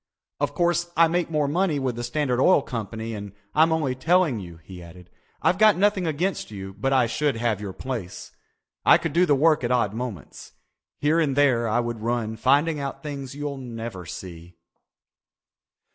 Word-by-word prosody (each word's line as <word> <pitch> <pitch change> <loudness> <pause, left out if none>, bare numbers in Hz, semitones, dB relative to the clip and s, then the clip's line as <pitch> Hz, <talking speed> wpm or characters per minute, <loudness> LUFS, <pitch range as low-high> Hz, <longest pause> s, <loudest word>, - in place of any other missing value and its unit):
"Of - - -1
course 175 -1 +1
I 165 0 +6
make 175 +1 -1
more 150 -3 0
money 165 +1 +1
with 130 -3 -2
the 120 - -5
Standard 125 0 0
Oil 165 -2 +5
Company 115 -1 -5
and 100 -2 -7 0.2
I'm 160 +2 +4
only 155 -5 0
telling 160 -2 +2
you," 85 -4 -10
he 90 0 -11
added. 90 +1 -14 0.3
"I've 185 - +2
got 215 -2 +6
nothing 195 -2 +2
against 170 +5 -2
you 95 -2 -8
but 110 +7 -2
I 130 -2 +4
should 140 +4 0
have 115 -3 -1
your 100 -2 -5
place. 115 -4 -6 0.5
I - - +7
could 165 - -4
do 175 +2 +3
the 145 - +4
work 155 0 +3
at 120 - 0
odd 120 -5 +1
moments. 115 -7 -7 0.4
Here 155 +3 +2
and 145 -5 +1
there 130 -5 +3
I 115 +2 +1
would 120 -2 -4
run 115 -1 -2
finding 145 +6 +2
out 140 0 -5
things 140 -3 -6
you'll 145 -1 -4
never 115 -8 -7
see." 85 0 -9
130 Hz, 185 wpm, -24 LUFS, 110-155 Hz, 0.5 s, I